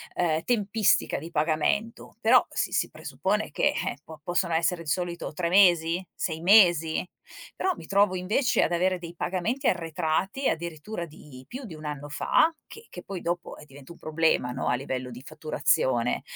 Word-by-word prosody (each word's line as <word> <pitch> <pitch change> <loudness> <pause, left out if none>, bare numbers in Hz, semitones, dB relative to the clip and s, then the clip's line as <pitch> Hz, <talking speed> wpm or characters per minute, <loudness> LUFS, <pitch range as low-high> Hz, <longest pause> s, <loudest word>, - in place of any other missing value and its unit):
ehm, 160 -2 0
tempistica 215 -3 +2
di 165 - -8
pagamento, 165 +9 -1
però 240 +3 +5
si - - -2
si - - 0
presuppone - - -2
che, - - +2
eh, - - -3
po 155 -2 -12
possono 175 -1 0
essere 170 +1 +1
di 150 - -6
solito 175 -1 -2
3 170 +1 -1
mesi? 175 -2 +4
6 160 -3 -3
mesi? 175 -4 +5 0.5
Però 375 - 0
mi 160 - -11
trovo 200 -1 +3
invece 220 +7 +1
ad - - 0
avere 180 +1 +1
dei 170 0 -9
pagamenti 190 +11 -2
arretrati 175 - -1
addirittura 170 +3 -4
di 135 -4 -13
più 260 +1 -7
di 175 - -9
1 155 - -12
anno 145 -1 -5
fa, 320 - +2
che 450 +1 -12
che - - -9
poi 195 -3 -6
dopo 175 +1 -3
eh, 150 - -13
diventa 140 +2 -14
un - - -19
problema, 155 -5 +1
no, - - -3
a 120 - +2
livello 130 -1 -4
di 125 +2 -9
fatturazione, 140 -5 0
170 Hz, 175 wpm, -27 LUFS, 155-195 Hz, 0.5 s, però